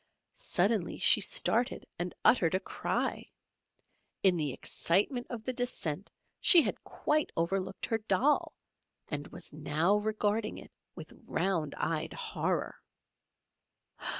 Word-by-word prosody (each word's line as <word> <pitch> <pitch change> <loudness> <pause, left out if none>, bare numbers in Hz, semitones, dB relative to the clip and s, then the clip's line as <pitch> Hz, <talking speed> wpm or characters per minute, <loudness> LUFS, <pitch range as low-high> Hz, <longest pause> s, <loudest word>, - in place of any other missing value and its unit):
Suddenly 205 - 0
she - - +5
started 240 +3 +2
and 175 0 -3
uttered 180 -7 +4
a - - +2
cry. 190 - -3 0.9
In 190 -2 +5
the 150 -4 -1
excitement 210 - 0
of 235 -3 -6
the 255 - -3
descent 205 - -1 0.3
she 340 -4 +7
had - - -3
quite 305 0 0
overlooked 190 +3 -1
her 225 - -1
doll, 220 +8 +1 0.5
and 145 -1 -4
was - - -9
now 155 +6 +1
regarding 215 0 -1
it - - -12 0.2
with - - -10
round 170 -7 -1
eyed 160 -1 -2
horror! - - -2
195 Hz, 120 wpm, -31 LUFS, 170-230 Hz, 0.9 s, she